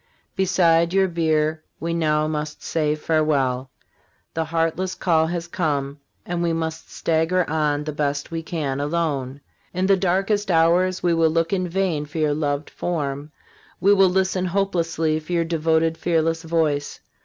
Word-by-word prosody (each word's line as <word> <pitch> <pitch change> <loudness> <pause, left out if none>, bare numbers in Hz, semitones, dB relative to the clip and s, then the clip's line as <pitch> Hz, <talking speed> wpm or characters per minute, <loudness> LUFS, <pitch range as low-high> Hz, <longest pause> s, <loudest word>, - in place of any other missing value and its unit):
Beside 175 -2 +3
your 195 0 +4
bier 155 -2 0 0.2
we 165 +1 -2
now 155 -2 +1
must 150 -1 -4
say 150 -2 0
farewell. 140 -5 0 0.6
The 160 0 -1
heartless 165 +3 -1
call 160 -3 +2
has 170 0 -3
come, 145 -5 -2 0.3
and 175 -1 -2
we 170 -1 +1
must 160 0 -4
stagger 165 +3 +1
on 150 -1 0
the 155 - -4
best 145 0 -2
we 165 0 -3
can 150 -5 -3
alone. 145 -3 -2 0.3
In 185 +1 +1
the 195 0 +5
darkest 195 +3 0
hours 175 +2 +3
we 175 -1 +3
will 165 -1 +3
look 165 +3 0
in 185 -2 0
vain 170 -5 -1
for 145 - -8
your 155 -2 +2
loved 145 -1 -2
form, 145 -3 -3 0.5
we 200 +3 +5
will 195 -2 +5
listen 185 0 +1
hopelessly 170 -4 0
for 155 +3 -7
your 170 -1 +2
devoted, 165 0 +1
fearless 165 -1 +1
voice. 160 -3 -1
165 Hz, 155 wpm, -22 LUFS, 150-175 Hz, 0.6 s, the